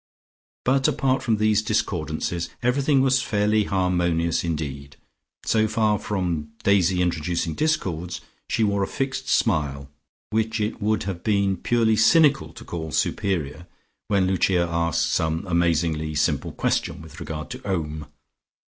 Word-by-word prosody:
But 135 +1 +3
apart 130 -1 +1
from 110 -3 +1
these 110 0 +3
discordances, 85 -5 -2
everything 135 +3 +2
was 130 -1 +3
fairly 105 0 +1
harmonious 90 -3 +1
indeed, 70 -4 -4 0.5
so 110 -1 +2
far 110 -2 +1
from 85 -7 -3
Daisy 95 -2 +3
introducing 85 -1 -1
discords, 90 - -1 0.3
she 115 - +1
wore 100 -1 +1
a 95 - 0
fixed 135 -1 -3
smile, 70 - 0 0.4
which 110 +1 0
it 105 +1 -2
would 110 +1 +1
have 95 -3 -5
been 100 -3 +2
purely 115 +3 +2
cynical 140 +5 +4
to - - -11
call 80 -2 -5
superior, 85 -4 -1 0.4
when 100 -2 +2
Lucia 90 -1 +2
asked 85 -1 0
some 80 +3 0
amazingly 85 -3 0
simple 75 - 0
question - - -1
with 80 -1 -12
regard 75 0 -6
to - - -7
Om. 80 -6 -3
95 Hz, 135 wpm, -24 LUFS, 80-110 Hz, 0.5 s, cynical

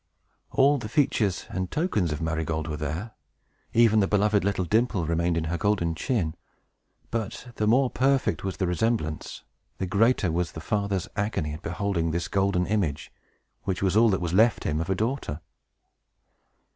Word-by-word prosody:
All 140 +1 +4
the 110 - -6
features 110 - +1
and 95 -1 -2
tokens 130 - 0
of 75 +2 -3
Marygold 80 -1 -2
were 75 - -3
there; 80 +9 -4 0.6
even 115 -2 +5
the 100 - +3
beloved 105 0 +2
little 95 -2 0
dimple 105 -2 +1
remained 85 +1 0
in 80 - 0
her 85 +1 -2
golden 95 -5 +1
chin. 85 -1 -1 0.8
But 115 +2 -4
the 105 - +1
more 125 +3 +4
perfect 135 +1 +1
was 95 -4 -3
the 95 - 0
resemblance, 90 -4 -1 0.3
the 95 - -2
greater 100 0 +2
was 85 -1 -1
the - - -6
father's 100 -3 -1
agony 100 -8 -1
at 75 - -8
beholding 90 -3 -1
this 85 +2 -2
golden 95 -2 +1
image, 90 -9 -1 0.5
which 95 0 -2
was 95 0 +2
all 115 +1 +6
that 95 -3 +1
was 85 -1 -2
left 110 +3 +4
him 75 +1 -1
of 85 - -4
a 95 - +2
daughter. 110 - -2
95 Hz, 170 wpm, -26 LUFS, 85-110 Hz, 0.8 s, all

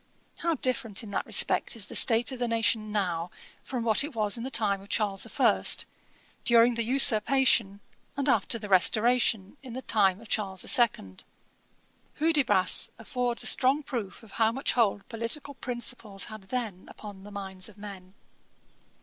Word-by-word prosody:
How 335 -1 -1
different 240 -6 -1
in 210 - -10
that - - -3
respect - - +2
is 220 -3 0
the - - -9
state 230 +1 +3
of 260 - -7
the 245 - -1
nation 225 -2 0
now 180 -5 -2 0.3
from 250 -3 -5
what 225 +2 +3
it 295 -3 -7
was 210 -2 +1
in 235 - -3
the 260 - -4
time 200 -6 +1
of 200 - -16
Charles 200 -3 -1
the - - -3
First, - - +1 0.6
during 235 0 +4
the 230 - -2
Usurpation, 235 -4 +4 0.4
and 280 0 -1
after 250 -2 +2
the 210 -2 -8
Restoration, 215 +3 +2
in 260 -3 -10
the 260 +2 -7
time 195 -3 +1
of 230 - -14
Charles 195 -4 -3
the - - -12
Second. 100 - +1 0.9
Hudibras 290 - +2
affords 240 +1 -3
a - - -4
strong 275 +4 +2
proof 230 -7 -6
how 220 +2 0
much 265 +4 -2
hold 205 -4 0
political 230 +6 -5
principles 240 -6 -4
had 215 -3 -11
then 225 -8 -4
upon 205 -3 -11
the 205 - -12
minds 190 -2 -6
of 215 - -18
men. 195 -2 -11
225 Hz, 170 wpm, -27 LUFS, 200-245 Hz, 0.9 s, during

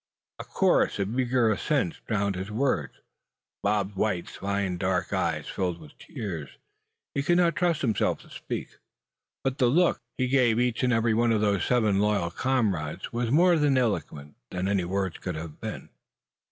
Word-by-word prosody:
A - - -4
chorus - - +2
of 105 +5 -2
eager 125 -3 +2
assents 105 - -1
drowned 100 -2 0
his 95 +3 -5
words. 110 - 0 0.7
Bob 100 -1 +1
White's 95 -3 -2
fine 100 -2 -2
dark 95 -1 0
eyes - - -1
filled 90 -2 -2
up 85 - -17
with 75 - -16
tears. 85 -9 -6 0.6
He 140 - 0
could 175 +5 +2
not 170 -2 +3
trust 175 -5 +1
himself 110 -6 +1
to - - -19
speak; - - -6 0.6
but 135 0 -1
the 125 - +4
look 170 +6 +3 0.2
he 130 - +1
gave 125 -3 +3
each 125 -1 +1
and 125 -1 +2
every 115 -1 +2
one 115 +1 +2
of 110 -2 +2
those 100 -2 +2
seven 110 -5 +2
loyal 100 -4 +1
comrades 100 - -1
was 120 0 -1
more 175 +7 +5
eloquent 125 - 0
than 90 +1 -2
any 100 -3 +1
words 95 -1 -2
could 90 -3 -4
have 80 -1 -8
been. - - -6
105 Hz, 170 wpm, -27 LUFS, 95-125 Hz, 0.7 s, more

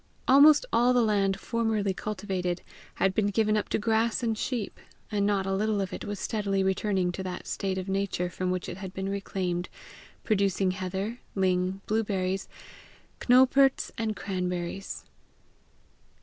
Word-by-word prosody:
Almost 290 - +7
all 245 +2 +4
the 245 -1 +4
land 195 -3 +1
formerly 220 -4 0
cultivated 185 -3 -3 0.3
had 195 -1 +2
been 205 +1 +1
given 215 +1 +2
up 210 - -1
to - - +1
grass 225 +2 +1
and 225 -1 +1
sheep, 225 -1 -3 0.3
and 205 -1 +1
not 200 -2 +1
a 195 - -1
little 210 +1 +1
of 195 -2 -3
it - - -5
was 205 -1 -4
steadily 200 -3 0
returning 190 -1 +1
to 185 - -5
that 185 -1 -5
state 190 -2 -2
of 185 0 -4
nature 195 -2 -1
from 180 +1 -3
which 180 -1 -2
it - - -6
had 190 -1 -8
been 190 0 -3
reclaimed, 185 -3 -2 0.5
producing 195 -3 +1
heather, 190 +5 -4 0.2
ling, 185 0 +1
blueberries, 195 -3 -1 0.7
cnowperts, 260 +2 +4
and 220 -2 -2
cranberries. 180 -1 -4
195 Hz, 150 wpm, -28 LUFS, 185-215 Hz, 0.7 s, Almost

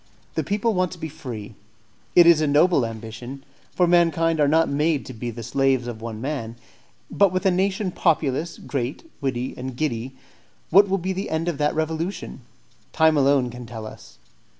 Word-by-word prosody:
The - - -1
people 210 +3 0
want 185 -3 0
to - - -10
be 160 -1 -5
free; 125 -9 -8 0.6
it 175 - +8
is 170 -2 +6
a 155 - +2
noble 145 -3 +4
ambition, 115 +4 -8 0.3
for 180 - +2
mankind 165 -2 +3
are 145 - +4
not 160 +3 +3
made 150 +1 0
to 130 - -8
be 120 +1 -5
the 115 0 -7
slaves 130 +1 +1
of 120 -2 -6
one 115 -1 -6
man; 130 -3 -4 0.6
but 200 -2 +4
with 185 +2 -2
a 190 - +5
nation 190 +1 0
populous, 160 -2 0
great, 135 - -4
witty, 130 -2 -2
and 125 -1 -6
giddy, 130 -3 -2 0.6
what 200 +3 +6
will 195 - +2
be 190 +1 -2
the 190 +2 -4
end 160 +2 -1
of 165 -5 -2
that 150 0 +1
revolution? 160 0 -3 0.5
Time 160 -1 +4
alone 135 -3 +3
can 125 0 -9
tell 110 -1 -7
us. 110 - -12
150 Hz, 185 wpm, -23 LUFS, 125-170 Hz, 0.6 s, it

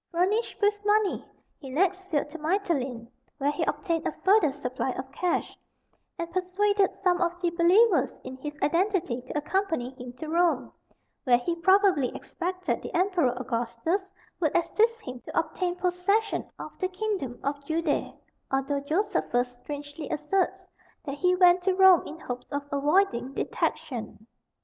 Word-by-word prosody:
Furnished 385 +7 0
with 415 0 +2
money, 415 -1 +2 0.4
he 270 - -9
next 375 +6 0
sailed 295 -4 0
to 330 - -8
Mitylene, 300 - -1 0.3
where 285 0 +1
he 295 - -2
obtained 335 -4 -1
a - - 0
further 385 -6 +5
supply 260 -2 -3
of 265 +1 -7
cash, 355 +5 -1 0.6
and 335 0 -4
persuaded 385 +2 +1
some 360 -2 0
of 350 0 0
the 350 -1 0
believers 340 - +4
in 260 - -7
his 295 +2 -7
identity 340 - +1
to 255 +4 -5
accompany 320 -5 -1
him 250 -2 -9
to 315 +5 -8
Rome, 335 +1 +1 0.5
where 245 -2 +5
he 335 +8 -2
probably 375 -4 +4
expected 365 +1 -3
the - - -7
Emperor 360 -8 +2
Augustus 240 - -1 0.4
would 315 -4 +2
assist 445 +7 +1
him 255 -6 -7
to - - -8
obtain 355 -1 -2
possession 360 +4 0
of - - -7
the 370 - +1
kingdom 370 - -3
of 280 0 -2
Judea; 315 0 0 0.4
although 270 +1 0
Josephus 285 - 0
strangely 290 +1 -7
asserts 330 +6 -1 0.4
that 275 - -3
he 360 +5 +2
went 360 0 +6
to 370 0 +1
Rome 380 -2 +7
in 315 - -8
hopes 245 -3 -6
of 285 0 -2
avoiding 280 -3 +1
detection. 240 -8 -3
335 Hz, 150 wpm, -27 LUFS, 280-375 Hz, 0.6 s, Rome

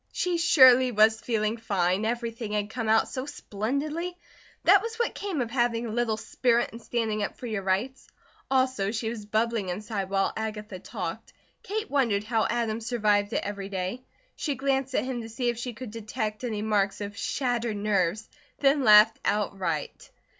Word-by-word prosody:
She 355 -2 -1
surely 260 -6 +7
was 220 0 +4
feeling 220 -1 -1
fine. 195 -2 0
Everything 230 -2 -3
had 210 0 -1
come 225 -2 -3
out 220 0 +4
so 260 +1 -5
splendidly. 295 - -3 0.5
That - - +6
was 455 0 -5
what 470 0 -1
came 385 -9 -3
of 230 -2 -3
having 240 -2 +1
a 225 - -4
little 225 -1 0
spirit 235 +2 +1
and 230 - -10
standing 220 -3 -1
up 205 - -3
for - - -8
your 215 -4 -2
rights. 200 +8 -1 0.4
Also 260 -7 +1
she 225 +1 -2
was 215 -3 -7
bubbling 220 -2 0
inside 200 +1 -3
while 195 0 +1
Agatha 215 -3 -5
talked. - - -6 0.3
Kate 430 +2 -4
wondered 235 -8 +2
how 225 0 +1
Adam 230 -1 -1
survived 210 -3 +1
it - - 0
every 200 -1 -5
day. 190 +5 -3 0.3
She 290 -3 -2
glanced 270 0 -1
at - - +1
him 255 -2 -3
to 225 - -8
see 240 +2 -1
if 235 -1 -3
she 245 0 -4
could 230 0 -8
detect 215 0 -4
any 215 -4 -2
marks 205 -2 +1
of 205 0 -5
shattered 240 -1 -1
nerves, 205 0 0 0.3
then 275 0 +3
laughed 215 0 +7
outright. 190 -7 -2
225 Hz, 175 wpm, -27 LUFS, 210-250 Hz, 0.5 s, surely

